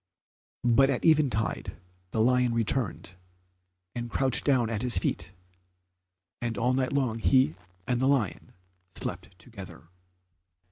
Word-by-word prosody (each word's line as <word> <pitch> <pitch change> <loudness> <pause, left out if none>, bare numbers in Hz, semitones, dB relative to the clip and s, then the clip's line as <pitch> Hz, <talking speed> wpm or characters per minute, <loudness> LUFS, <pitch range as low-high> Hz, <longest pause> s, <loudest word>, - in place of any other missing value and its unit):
But 125 +3 +4
at 135 - -1
eventide 145 -9 +1 0.3
the 110 - 0
lion 125 0 +3
returned, 115 -5 -1 0.8
and 120 -1 -5
couched 130 +1 +2
down 130 -5 +3
at 110 -2 -1
his 125 -1 +2
feet, - - -1 1.1
and 115 -3 -2
all 125 +3 +1
night 130 0 0
long 130 -5 0
he 130 0 +3 0.3
and 125 +1 0
the 130 - +3
lion 130 -9 0 0.4
slept 90 0 -6
together. 95 - -11
120 Hz, 125 wpm, -28 LUFS, 110-130 Hz, 1.1 s, But